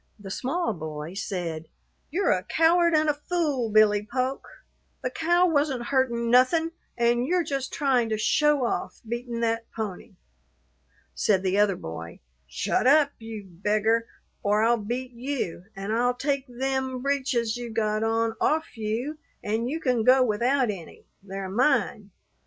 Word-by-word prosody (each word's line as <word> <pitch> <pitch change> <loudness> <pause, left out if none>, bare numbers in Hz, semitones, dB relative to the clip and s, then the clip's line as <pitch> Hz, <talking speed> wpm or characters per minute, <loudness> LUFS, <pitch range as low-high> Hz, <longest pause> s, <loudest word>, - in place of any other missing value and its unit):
The 195 -2 -8
small 320 - -1
boy 155 -1 -6
said, 175 -5 -4 0.4
"You're 370 +6 +1
a 180 - +2
coward 335 - +3
an' 310 0 +3
a 300 - +3
fool, 290 -6 -1
Billy 210 -1 +4
Polk. 255 +2 -2 0.6
The 255 - -1
cow 345 +5 +3
wasn't 285 -6 +1
hurtin' 235 -3 +1
nothin', 320 +7 +4 0.3
an' 240 0 +2
you're 355 +4 +1
just 275 -3 -3
tryin' 260 -6 +1
to 220 - 0
show 290 +5 +3
off, - - -3
beatin' 235 0 -4
that 230 0 -1
pony." 210 -5 -6 1.0
Said 195 -3 +1
the 190 +1 +1
other 205 -2 +3
boy, 85 - -8 0.3
"Shut 65 - 0
up, 285 +1 +5
you 225 -2 -7
beggar, 215 +5 +1 0.3
or 210 +1 +2
I'll 235 +1 +4
beat 245 +4 -4
you; 240 -8 -4
an' 195 +2 -4
I'll 245 +2 +2
take 275 +1 -1
them 260 0 -2
breeches 260 -5 0
you 240 -1 -5
got 215 -1 0
on 225 0 +1
off 315 -2 0
you, 230 +8 -3 0.2
an' 220 +3 -1
you 310 +5 -2
can 250 -7 +1
go 255 +2 +6
without 245 +2 +1
any 175 -5 -10 0.2
they're 195 0 -6
mine. 215 -1 +1
235 Hz, 150 wpm, -26 LUFS, 210-275 Hz, 1.0 s, go